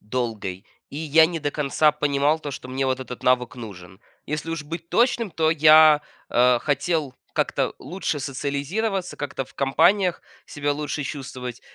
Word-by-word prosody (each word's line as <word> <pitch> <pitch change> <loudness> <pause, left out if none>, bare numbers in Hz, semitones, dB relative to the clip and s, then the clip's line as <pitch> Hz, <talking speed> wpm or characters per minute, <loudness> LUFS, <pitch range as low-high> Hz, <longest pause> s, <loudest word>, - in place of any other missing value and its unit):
долгой. 105 -4 -4 0.3
И 140 - -8
я 160 +1 +4
не 170 0 -4
до 145 - -1
конца 150 +1 +2
понимал 145 +1 +1
то, 150 -2 -6
что 130 -2 -8
мне 135 +1 -1
вот 130 0 -1
этот 125 -1 -8
навык 125 -1 +1
нужен. 95 -4 -10 0.3
Если 150 +2 -4
уж 165 -2 -3
быть 165 +2 -7
точным, 235 -2 +2
то 160 0 +1
я, 155 -1 +7 0.3
э, 125 0 +4
хотел 145 -1 -1 0.2
как-то - - 0
лучше 155 0 -4
социализироваться, 145 - -3
как-то 145 -2 -4
в - - -22
компаниях 180 +7 +2 0.2
себя 145 0 -2
лучше 150 0 -3
чувствовать. 130 -4 -6
145 Hz, 160 wpm, -23 LUFS, 130-160 Hz, 0.3 s, я